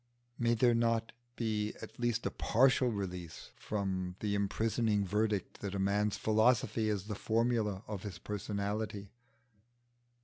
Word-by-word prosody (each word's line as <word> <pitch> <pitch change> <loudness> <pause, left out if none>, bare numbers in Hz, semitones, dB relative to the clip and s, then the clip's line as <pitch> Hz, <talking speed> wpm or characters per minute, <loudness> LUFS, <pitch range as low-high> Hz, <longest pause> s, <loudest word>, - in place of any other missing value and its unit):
May 120 -1 +3
there 120 +1 +4
not 115 -1 +1 0.2
be 105 -2 -1
at 110 - -10
least 120 -1 0
a - - 0
partial 130 +2 +3
release 90 -6 -5
from 95 -3 -2
the 105 -1 -1
imprisoning 105 +1 +1
verdict 105 0 -1
that 100 -1 -3
a - - 0
man's 100 +2 +1
philosophy 110 0 +2
is 100 -3 -1
the 105 - -4
formula 110 -2 0
of 105 -3 -4
his 100 -3 -6
personality? 105 +1 -3
105 Hz, 135 wpm, -33 LUFS, 100-115 Hz, 0.2 s, there